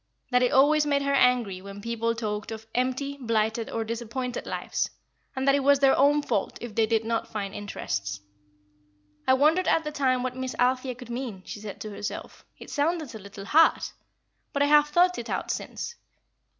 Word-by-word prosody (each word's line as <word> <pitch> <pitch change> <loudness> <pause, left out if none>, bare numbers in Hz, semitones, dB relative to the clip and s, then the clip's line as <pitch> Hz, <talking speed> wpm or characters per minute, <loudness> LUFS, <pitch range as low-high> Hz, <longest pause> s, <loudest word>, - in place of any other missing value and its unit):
that 250 0 +4
it 250 - +3
always 295 +3 +5
made 285 -1 +1
her 280 0 +1
angry 245 -8 +3
when 200 +1 -9
people 230 +1 -1
talked 215 -1 -3
of 220 0 -7
empty, 260 +3 -1
blighted, 225 -1 0
or 225 - -2
disappointed 235 +2 -4
lives, - - -2 0.5
and 265 +1 -2
that 275 - +6
it 285 - +3
was 280 +1 +5
their 270 -1 +5
own 290 +2 +4
fault 215 -8 -1
if 240 -2 -7
they 220 0 +2
did 225 0 +1
not 230 0 -1
find 205 -4 -4
interests. 100 - -4 1.1
"I 260 - +6
wondered 310 +7 +3
at 325 - +3
the 300 - -4
time 260 -4 +1
what 255 0 -3
Miss 260 0 -4
Althea 255 0 +1
could 245 -1 -10
mean," 235 -6 -5
she - - -7
said 205 -1 -8
to 215 - -5
herself; 205 0 -6
"it - - -11
sounded 310 -2 0
a 220 - -7
little 200 0 -10
hard. 315 +9 +5 0.7
But 280 - +2
I - - +4
have 295 0 +6
thought 355 +4 +3
it - - -7
out - - -2
since. - - -5
250 Hz, 195 wpm, -27 LUFS, 220-280 Hz, 1.1 s, that